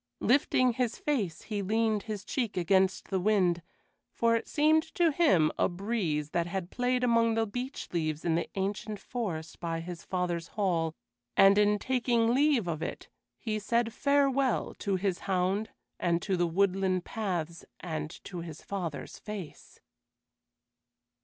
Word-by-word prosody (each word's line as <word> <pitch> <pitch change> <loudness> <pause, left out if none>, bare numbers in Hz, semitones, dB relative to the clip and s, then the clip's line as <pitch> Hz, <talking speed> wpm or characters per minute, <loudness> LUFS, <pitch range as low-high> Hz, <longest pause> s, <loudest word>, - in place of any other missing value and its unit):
Lifting 255 0 +3
his 245 -1 -1
face, 215 - -1
he 210 -2 -3
leaned 220 +1 +1
his 210 -2 -4
cheek 235 -8 -2
against 190 +2 +2
the 190 - 0
wind, 185 -3 +2 0.5
for 230 0 +2
it 230 - -2
seemed 310 +1 +4
to 340 -2 +4
him 190 - +4
a - - +3
breeze 175 -6 -2
that 170 0 0
had 185 0 -4
played 250 0 0
among 230 -2 +3
the 225 0 +2
beech 245 +6 -5
leaves 155 -2 -1
in 170 - +2
the 170 - -1
ancient 200 +2 -2
forest 180 -10 -5
by 165 -1 -2
his 170 +1 -7
father's 175 -2 -2
hall, 165 -5 +1 0.4
and 195 +1 +7
in 210 0 +4
taking 235 -1 +1
leave 275 -6 +3
of 160 -2 -2
it - - -5 0.3
he 215 -2 -2
said 230 +2 0
farewell 275 -2 +2
to 200 -3 0
his 190 -1 -1
hound 190 +3 +1 0.3
and 170 -1 +1
to 195 - 0
the 175 -1 +1
woodland 185 0 +1
paths 175 -6 -3 0.2
and 155 -3 -4
to 180 - -6
his 165 -2 -8
father's 175 -7 -5
face. 205 -7 -8
200 Hz, 155 wpm, -30 LUFS, 175-230 Hz, 0.5 s, and